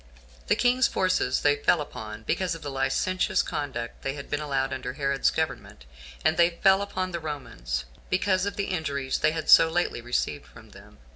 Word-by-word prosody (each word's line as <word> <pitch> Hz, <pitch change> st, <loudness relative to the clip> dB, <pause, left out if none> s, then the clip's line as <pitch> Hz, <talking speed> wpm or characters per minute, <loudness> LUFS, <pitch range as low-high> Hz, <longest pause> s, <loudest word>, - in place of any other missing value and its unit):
The -, -, +3 dB
king's 250 Hz, +1 st, +3 dB
forces 185 Hz, -9 st, +1 dB
they 145 Hz, 0 st, +3 dB
fell 155 Hz, +3 st, +3 dB
upon, 110 Hz, -7 st, -7 dB
because 175 Hz, -, -1 dB
of 165 Hz, -, -10 dB
the 145 Hz, -, -4 dB
licentious 185 Hz, +7 st, +1 dB
conduct 120 Hz, -5 st, -5 dB
they 135 Hz, -, -2 dB
had 140 Hz, -, -9 dB
been 145 Hz, -, 0 dB
allowed 135 Hz, -3 st, -1 dB
under 130 Hz, -1 st, -4 dB
Herod's 140 Hz, -1 st, +1 dB
government; 160 Hz, -, -4 dB, 0.4 s
and -, -, +3 dB
they 170 Hz, 0 st, +3 dB
fell 195 Hz, 0 st, +6 dB
upon 185 Hz, -2 st, -3 dB
the 170 Hz, -, -3 dB
Romans, 115 Hz, -, -5 dB, 0.2 s
because 185 Hz, +1 st, +1 dB
of 200 Hz, -, -3 dB
the 200 Hz, -, -1 dB
injuries 140 Hz, -6 st, -2 dB
they 155 Hz, -, +3 dB
had 160 Hz, 0 st, -4 dB
so 165 Hz, -, +8 dB
lately 165 Hz, -7 st, -1 dB
received 120 Hz, -11 st, -2 dB
from -, -, -16 dB
them. -, -, -16 dB
150 Hz, 190 wpm, -26 LUFS, 130-185 Hz, 0.4 s, so